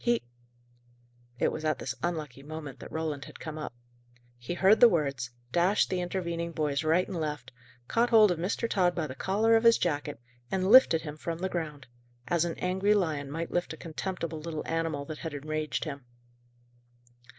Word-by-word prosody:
He 240 -1 +2 0.6
" 120 0 -33 0.3
It - - +2
was 155 - -5
at 155 -1 +1
this 130 - -4
unlucky 155 -6 -3
moment 145 -2 -8
that - - -10
Roland 155 -3 -3
had - - -12
come 155 -1 -6
up. 150 - -5 0.7
He 120 +8 -4
heard 195 +4 +5
the 240 - +9
words, 140 - -1 0.2
dashed 180 +7 +2
the 185 -1 0
intervening 170 -2 -3
boys 150 -1 0
right 165 +4 +2
and 190 - -5
left, 150 -5 -4 0.4
caught 235 +1 +2
hold 215 -4 +7
of 170 - -2
Mr. 200 +6 -1
Tod 180 -5 +2
by 165 - -1
the 130 - -6
collar 210 +10 +2
of 225 - +3
his 230 0 +7
jacket, 145 -5 -2 0.3
and 190 +1 0
lifted 225 -11 +7
him 150 -1 -6
from 165 +1 -4
the 190 +2 -2
ground, 155 -6 -4 0.4
as 170 -1 +2
an 170 - -3
angry 190 +3 +2
lion 155 -8 -1
might 165 +3 -4
lift 175 -2 -1
a - - -9
contemptible 170 0 -4
little 155 0 -5
animal 165 -3 -2
that 155 0 -7
had 160 -3 -5
enraged 155 +1 -2
him. 140 -4 -6
165 Hz, 190 wpm, -29 LUFS, 150-185 Hz, 0.7 s, the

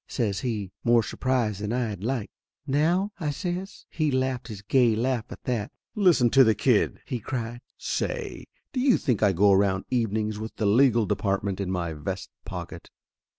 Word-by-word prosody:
says 105 -6 -1
he, 105 -7 -3
more 120 -1 +4
sur - - -6
prised 120 -6 0
than 105 +1 -2
I 120 -3 -1
liked. 110 +3 -3 0.3
"Now?" 165 +8 +1
I 155 -4 -1
says. 180 +6 -4
He 155 -2 0
laughed 130 -2 -1
his 105 -4 -8
gay 120 0 +3
laugh 120 0 0
at - - -10
that. 115 -5 -2 0.2
"Listen 175 - +4
to 135 -1 +7
the 110 -3 +4
kid 105 +1 +2
!" - - -41
he 125 -2 -3
cried. 120 +1 -4 0.2
"Say - - -3 0.3
do 260 - -1
you 255 -1 +4
think 125 -8 0
I 105 -2 +5
go 100 +3 +4
around 95 -1 +2
evenings 110 -3 0
with 110 +1 -6
the 110 - -1
legal 115 +1 +4
department 100 0 -1
in 95 - -2
my 85 -3 -2
vest 80 +1 -5
pocket?" - - -7
115 Hz, 185 wpm, -26 LUFS, 100-130 Hz, 0.3 s, to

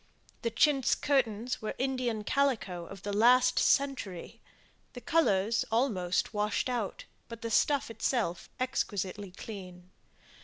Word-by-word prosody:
The 230 - 0
chintz 270 +3 +3
curtains 245 -4 0
were 215 - -4
Indian 255 -4 -1
calico 210 -10 0
of 195 +1 -11
the 205 - -3
last 245 +4 +5
century 260 -11 0 0.5
the 245 - -7
colours 230 -8 +2
almost 215 -7 0
washed 210 +4 0
out, 235 -6 -3 0.2
but 230 0 -9
the 230 - -3
stuff 280 +2 +2
itself 220 -5 -1
exquisitely 205 -6 -2
clean. 185 -2 -10
225 Hz, 120 wpm, -30 LUFS, 195-255 Hz, 0.5 s, last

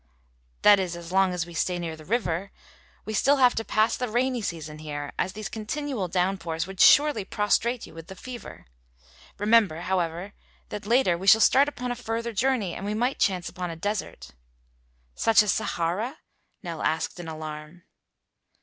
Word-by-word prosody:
"That 205 -1 +7
is, 180 -2 -2
as 170 0 -9
long 190 0 +3
as 180 -2 -2
we 170 - -12
stay 180 +2 -1
near 165 -2 -4
the 155 - -13
river. 195 -3 -1 0.5
We 215 - -4
still 275 +7 +4
have 250 -2 +5
to 225 - -2
pass 215 0 +2
the 250 -2 -3
rainy 245 +2 0
season 155 -5 -5
here, 145 -2 -6
as 185 - -1
these 215 0 -5
continual 230 -1 -3
downpours 180 -2 -1
would 190 0 -10
surely 290 -8 +6
prostrate 220 +4 0
you - - -14
with 165 0 -10
the 190 - -9
fever. 245 +4 -9 0.7
Remember, 205 -6 +3
however, 180 +1 -2 0.4
that 205 -1 -6
later 225 -8 +3
we 190 - -6
shall 220 +3 +8
start 275 +6 +5
upon 250 -3 -5
a - - -2
further 230 0 -4
journey 225 -5 0
and - - -7
we 205 +1 -2
might 245 +5 0
chance 185 -3 +1
upon 180 -1 -5
a 165 - -5
desert." 165 - -4 0.8
"Such 220 - +4
as 205 - +1
Sahara?" 210 - -2 0.5
Nell 170 -3 -5
asked 160 +2 -1
in 175 - -7
alarm. 155 +1 -8
195 Hz, 175 wpm, -26 LUFS, 170-230 Hz, 0.8 s, shall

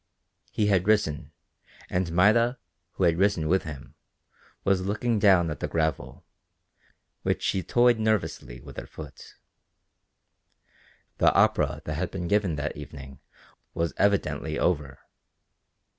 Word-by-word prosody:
He 105 - 0
had 95 -2 +2
risen, 80 -8 +1 0.6
and 90 -2 -1
Maida, 115 +8 +3 0.4
who - - -2
had 85 -1 +3
risen 95 -5 +2
with 95 +4 +1
him, 75 -2 -9 0.7
was 95 -1 +2
looking 110 +2 0
down 95 -5 +4
at 75 - -6
the - - -2
gravel, 80 -4 -2 1.0
which - - -1
she 95 - 0
toyed 120 +5 +3
nervously 110 - -1
with - - -12
her - - -6
foot. 75 -3 -11 1.8
The - - +5
opera - - +2
that 75 - -3
had 85 +4 -2
been 90 -2 -5
given 100 -3 +1
that 75 +1 -3
evening 70 -2 -10 0.6
was 85 -1 -1
evidently 100 -1 0
over. 70 -2 -1
90 Hz, 130 wpm, -26 LUFS, 75-100 Hz, 1.8 s, The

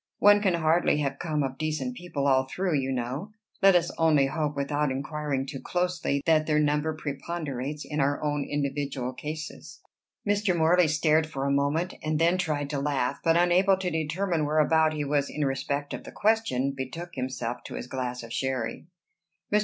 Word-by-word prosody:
"One 205 0 +6
can 190 -4 +2
hardly 165 -1 +2
have 135 -1 -2
come 155 -4 -1
of 135 -1 -4
decent 155 +11 -2
people 175 - -4
all 130 -1 +3
through, 185 +2 -1
you 135 0 -2
know. 130 - -3 0.3
Let 195 -1 +7
us 175 0 +2
only 155 -4 +4
hope, 150 +1 -2
without 145 +1 0
inquiring 140 0 -2
too 135 0 -6
closely, 175 -5 -1
that 155 -2 +3
their 150 -1 +2
number 150 +1 +1
preponderates 145 -1 -4
in 150 0 -3
our 140 +1 +1
own 145 -1 0
individual 140 -3 -2
cases." 155 +4 -7 0.5
Mr. 205 -3 +2
Morley 170 +2 +4
stared 155 +1 +2
for 135 -3 -4
a 140 - +1
moment, 145 +6 +1
and 155 0 -1
then 170 +3 +3
tried 150 -5 -1
to 145 - -1
laugh, 140 -3 -1
but 165 0 +4
unable 180 +2 +4
to 185 -1 -2
determine 160 +1 -1
whereabout 155 +1 +3
he 150 -1 -2
was 140 0 0
in 150 -1 -2
respect 140 +1 -2
of - - -6
the - - -10
question, 200 - +1
betook 150 +7 -6
himself 130 -2 -4
to - - -7
his - - -5
glass 125 -1 -4
of 115 0 -8
sherry. 130 +2 -2 0.7
Mr. 210 - +6
150 Hz, 185 wpm, -27 LUFS, 140-165 Hz, 0.7 s, Let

